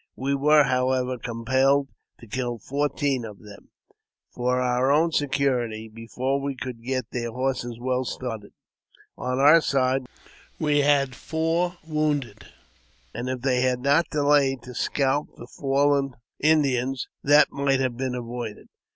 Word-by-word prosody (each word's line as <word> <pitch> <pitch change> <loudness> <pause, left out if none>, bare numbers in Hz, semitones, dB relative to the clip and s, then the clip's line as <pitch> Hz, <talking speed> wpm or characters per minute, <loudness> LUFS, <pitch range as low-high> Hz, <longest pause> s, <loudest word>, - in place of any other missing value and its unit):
We 135 +2 -1
were, 150 +2 +5
however, 130 -1 0
compelled 130 +4 +1 0.3
to - - -13
kill 120 +1 -3
fourteen 140 +1 -1
of 105 -3 -8
them, 105 -1 -14 0.6
for 125 +1 0
our 125 +1 +1
own 160 +3 +3
security, 125 -7 0
before 125 +5 -3
we 140 0 -3
could 125 -2 -7
get 130 0 -3
their 120 -1 -3
horses 125 -1 -2
well 130 +1 -1
started. 115 -5 -6 0.6
On 125 0 -3
our 150 +5 +7
side 130 -2 +1 0.5
we 150 -2 +2
had 140 -2 +3
four 165 +6 -1
wounded; 145 -8 -2 0.7
and 120 +3 -4
if 130 -1 -3
they 130 -1 +1
had 125 -1 +1
not 145 +5 +3
delayed 145 -4 +2
to 125 0 -9
scalp 140 +4 -1
the - - -9
fallen 140 0 +1 0.2
Indians, 135 -4 +1 0.2
that 145 +1 +5
might 140 -1 +1
have 130 -2 -1
been 130 0 -3
avoided. 120 -3 -6
130 Hz, 140 wpm, -25 LUFS, 125-140 Hz, 0.7 s, our